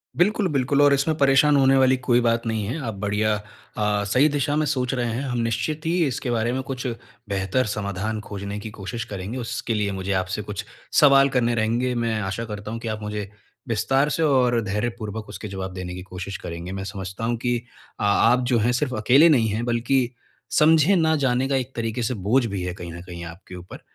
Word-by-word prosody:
बिल्कुल, 205 Hz, +3 st, +2 dB
बिल्कुल 140 Hz, -2 st, +1 dB
और 145 Hz, -1 st, +6 dB
इसमें 150 Hz, +3 st, +1 dB
परेशान 140 Hz, +1 st, +5 dB
होने 135 Hz, 0 st, +5 dB
वाली 130 Hz, 0 st, +5 dB
कोई 125 Hz, -1 st, +2 dB
बात 115 Hz, 0 st, +1 dB
नहीं 110 Hz, -1 st, -1 dB
है। 125 Hz, +9 st, -3 dB
आप 115 Hz, -2 st, -3 dB
बढ़िया 105 Hz, +1 st, +1 dB, 0.4 s
अ, 105 Hz, -1 st, +1 dB
सही 125 Hz, +9 st, +3 dB
दिशा 145 Hz, 0 st, 0 dB
में 155 Hz, 0 st, +1 dB
सोच 130 Hz, -3 st, -1 dB
रहे 120 Hz, -2 st, -1 dB
हैं। 120 Hz, -, -2 dB
हम 125 Hz, -3 st, -2 dB
निश्चित 120 Hz, +7 st, -1 dB
ही 165 Hz, -, +1 dB, 0.2 s
इसके 125 Hz, -1 st, -3 dB
बारे 115 Hz, 0 st, 0 dB
में 130 Hz, -, -1 dB
कुछ 130 Hz, -1 st, -4 dB, 0.4 s
बेहतर 100 Hz, +5 st, 0 dB
समाधान 105 Hz, +1 st, -3 dB
ख़ोजने 100 Hz, 0 st, -5 dB
की 110 Hz, -, -7 dB
कोशिश 110 Hz, +4 st, -4 dB
करेंगे। 100 Hz, +3 st, -6 dB
उसके 115 Hz, -1 st, -3 dB
लिए 105 Hz, -2 st, 0 dB
मुझे 95 Hz, 0 st, -3 dB
आपसे 95 Hz, +3 st, -4 dB
कुछ 105 Hz, 0 st, -5 dB, 0.4 s
सवाल 140 Hz, -1 st, +6 dB
करने 120 Hz, -3 st, +1 dB
रहेंगे। 120 Hz, +3 st, 0 dB
मैं 115 Hz, -2 st, 0 dB
आशा 95 Hz, +4 st, -3 dB
करता 105 Hz, -1 st, -6 dB
हूँ 115 Hz, -, -4 dB
कि 115 Hz, -, -6 dB
आप 110 Hz, 0 st, -3 dB
मुझे 105 Hz, -1 st, -4 dB, 0.4 s
विस्तार 135 Hz, +6 st, +1 dB
से 165 Hz, -, 0 dB
और 125 Hz, -5 st, +3 dB
धैर्यपूर्वक 110 Hz, +1 st, -3 dB
उसके 110 Hz, -, -7 dB
जवाब 95 Hz, -1 st, -5 dB
देने 90 Hz, -1 st, -6 dB
की 90 Hz, -, -6 dB
कोशिश 95 Hz, +1 st, -6 dB
करेंगे। 85 Hz, +2 st, -7 dB
मैं 95 Hz, 0 st, -4 dB
समझता 95 Hz, 0 st, -6 dB
हूँ 120 Hz, +1 st, 0 dB
कि 120 Hz, 0 st, -1 dB, 0.4 s
आ 105 Hz, -, +1 dB, 0.2 s
आप 125 Hz, 0 st, +2 dB
जो 120 Hz, -, +4 dB
हैं, 120 Hz, +3 st, +2 dB
सिर्फ़ 130 Hz, +1 st, -1 dB
अकेले 130 Hz, +10 st, +5 dB
नहीं 120 Hz, -8 st, +4 dB
हैं 110 Hz, +3 st, -2 dB
बल्कि 120 Hz, +3 st, +1 dB, 0.6 s
समझे 160 Hz, +4 st, +5 dB
ना 160 Hz, -2 st, +3 dB
जाने 125 Hz, +1 st, +1 dB
का 135 Hz, -, +1 dB
एक 130 Hz, 0 st, -3 dB
तरीके 115 Hz, +1 st, -2 dB
से 115 Hz, -, 0 dB
बोझ 120 Hz, +4 st, +3 dB
भी 100 Hz, -4 st, -3 dB
है 90 Hz, 0 st, -3 dB
कहीं 90 Hz, -2 st, -8 dB
न 85 Hz, -, -8 dB
कहीं 85 Hz, -1 st, -8 dB
आपके 85 Hz, +2 st, -10 dB
ऊपर। 90 Hz, +1 st, -10 dB
115 Hz, 215 wpm, -23 LUFS, 100-130 Hz, 0.6 s, और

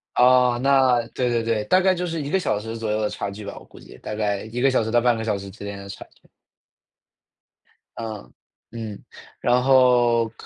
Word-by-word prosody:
哦， 125 Hz, -1 st, +4 dB
那 130 Hz, -3 st, +4 dB
对 125 Hz, -, -2 dB
对 115 Hz, -1 st, 0 dB
对。 110 Hz, -2 st, -1 dB
大 185 Hz, -, +4 dB
概 190 Hz, 0 st, +3 dB
就 180 Hz, +1 st, -3 dB
是 165 Hz, -2 st, -3 dB
1 140 Hz, -, -5 dB
个 190 Hz, -, +1 dB
小 105 Hz, -, -1 dB
时 115 Hz, +2 st, -6 dB
左 110 Hz, -1 st, -3 dB
右 110 Hz, +1 st, 0 dB
的 105 Hz, -, 0 dB
差 100 Hz, -, -5 dB
距 105 Hz, +1 st, -9 dB
吧， -, -, -7 dB
我 -, -, -12 dB
估 -, -, -17 dB
计。 -, -, -14 dB
大 105 Hz, -, -7 dB
概 105 Hz, -2 st, -2 dB
1 120 Hz, +3 st, -5 dB
个 135 Hz, -, +4 dB
小 130 Hz, -4 st, +1 dB
时 110 Hz, -, -4 dB
到 120 Hz, 0 st, +3 dB
半 120 Hz, -1 st, +3 dB
个 110 Hz, -, -4 dB
小 105 Hz, -3 st, -1 dB
时 100 Hz, 0 st, -9 dB
之 100 Hz, +1 st, -11 dB
间 100 Hz, 0 st, -6 dB
的 100 Hz, 0 st, -10 dB
差 -, -, -9 dB
距。 -, -, -29 dB, 1.7 s
嗯。 110 Hz, -2 st, -7 dB, 0.4 s
嗯。 110 Hz, -3 st, -8 dB, 0.3 s
然 125 Hz, +1 st, +2 dB
后 120 Hz, -3 st, +4 dB
115 Hz, 230 characters per minute, -23 LUFS, 105-125 Hz, 1.7 s, 哦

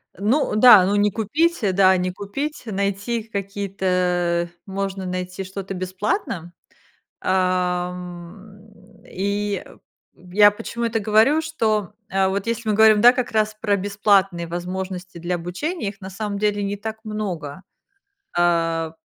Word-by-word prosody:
Ну 220 Hz, -, +1 dB
да, 215 Hz, -4 st, +8 dB
ну, 200 Hz, +2 st, +1 dB
не 205 Hz, 0 st, +3 dB
купить, 305 Hz, -, 0 dB, 0.2 s
да, 190 Hz, -1 st, +5 dB
не 180 Hz, 0 st, -1 dB
купить, 205 Hz, +11 st, -5 dB
найти 200 Hz, +2 st, -2 dB
какие-то 185 Hz, -4 st, -1 dB, 0.2 s
можно 195 Hz, -1 st, -4 dB
найти 185 Hz, +1 st, -4 dB
что-то 195 Hz, +1 st, -6 dB
бесплатно. 185 Hz, -, -3 dB, 0.7 s
Ам, 180 Hz, +2 st, -2 dB, 0.4 s
и 200 Hz, +1 st, -2 dB, 0.5 s
я 200 Hz, +4 st, +4 dB
почему 235 Hz, +3 st, -5 dB
это 230 Hz, -1 st, 0 dB
говорю, 220 Hz, +9 st, +3 dB
что, 220 Hz, -, -1 dB, 0.2 s
а 190 Hz, 0 st, +2 dB
вот 195 Hz, +1 st, -2 dB
если 230 Hz, -1 st, -2 dB
мы 210 Hz, -, +2 dB
говорим 215 Hz, -1 st, +6 dB
как 245 Hz, +2 st, +5 dB
раз 215 Hz, -1 st, +1 dB
про 210 Hz, -2 st, +1 dB
бесплатные 195 Hz, -3 st, +1 dB
возможности 180 Hz, +1 st, -5 dB
для 175 Hz, +1 st, -2 dB
обучения, 200 Hz, -, -3 dB
их 200 Hz, 0 st, -13 dB
на 190 Hz, -, -7 dB
самом 200 Hz, +1 st, -4 dB
деле 205 Hz, 0 st, 0 dB
не 200 Hz, 0 st, -2 dB
так 220 Hz, +2 st, -5 dB
много, 190 Hz, -7 st, -5 dB, 0.7 s
а, 165 Hz, -2 st, +1 dB
195 Hz, 130 wpm, -22 LUFS, 180-215 Hz, 0.7 s, да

